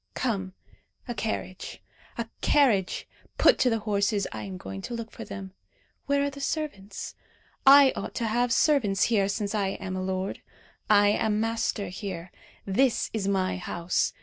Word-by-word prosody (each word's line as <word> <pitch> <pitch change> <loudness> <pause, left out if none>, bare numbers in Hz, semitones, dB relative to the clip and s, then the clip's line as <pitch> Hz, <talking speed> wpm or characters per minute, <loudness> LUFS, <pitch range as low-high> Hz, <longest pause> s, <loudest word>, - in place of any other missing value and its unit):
Come! 195 -7 -2 0.5
a 240 - -2
carriage, 195 -5 -4 0.4
a 235 -1 -3
carriage! 230 -11 +2 0.3
put - - +5
to 255 - +4
the 225 - +1
horses. 205 -1 0
I 110 - -5
am 95 -2 -6
going 95 +1 -7
to 240 - -5
look 230 -1 -6
for 230 - -8
them. 195 -2 -8 0.5
Where 280 0 +2
are 285 - -1
the 280 0 -9
servants? 275 -11 -4 0.5
I 275 -1 +9
ought - - -5
to 235 - -1
have 240 +2 +1
servants 230 -8 +3
here, 200 -2 +3
since 205 0 -2
I 195 -2 0
am 185 -1 -4
a 185 - -2
lord. 190 +1 -3 0.5
I 205 -1 +6
am 210 0 +1
master 225 -2 -1
here. 180 -2 -6 0.3
This 235 +6 +2
is 210 -3 -1
my 190 -2 +1
house. 175 -1 -1
205 Hz, 165 wpm, -27 LUFS, 190-235 Hz, 0.5 s, I